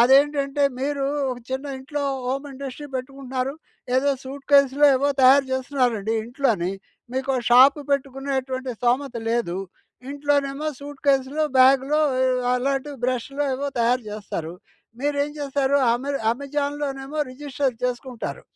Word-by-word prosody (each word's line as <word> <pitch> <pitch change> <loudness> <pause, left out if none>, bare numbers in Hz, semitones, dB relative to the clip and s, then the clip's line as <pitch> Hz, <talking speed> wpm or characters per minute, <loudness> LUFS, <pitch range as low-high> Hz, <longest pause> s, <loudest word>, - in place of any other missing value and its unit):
అదేంటంటే 280 +2 +3 0.2
మీరు 280 0 -1 0.3
ఒక 250 - -5
చిన్న 265 +2 -3
ఇంట్లో 290 +2 -4 0.2
హోమ్ 275 +3 -2
ఇండస్ట్రీ 275 +2 -7
పెట్టుకుంటున్నారు. 265 0 -4 0.4
ఏదో 280 +2 +2 0.2
సూట్కేస్‌లో, 280 +1 +3
ఏవో 285 +2 +1
తయారు 270 +1 +7
చేస్తున్నారండి 250 -5 0
ఇంట్లోనే. 230 -8 0 0.4
మీకు 265 +1 -3
ఓ - - +1
షాప్ 260 +5 +7
పెట్టుకునేటువంటి 265 -1 -2
స్థోమత 250 +2 +1 0.2
లేదు. 230 -7 0 0.6
ఇంట్లోనేమో 285 0 0
సూట్కేస్‌లో, 285 +1 0
బ్యాగ్‌లో 270 +3 +5 0.2
ఆహ్, 255 -1 +2
అలాంటి 270 +3 -1
బ్రష్‌లో 255 +3 -1
ఏవో 280 +2 -2
తయారు 240 +2 +2
చేస్తారు. 200 -6 -5 0.5
మీరేం 285 +1 0
చేస్తారు? 280 -1 +1 0.2
అమె 265 +4 -2 0.2
అమెజాన్‍లోనేమో 280 +1 -3
రిజిస్టర్ 270 -1 -2
చేసుకుంటారు. 250 -1 -4
270 Hz, 115 wpm, -23 LUFS, 255-285 Hz, 0.6 s, తయారు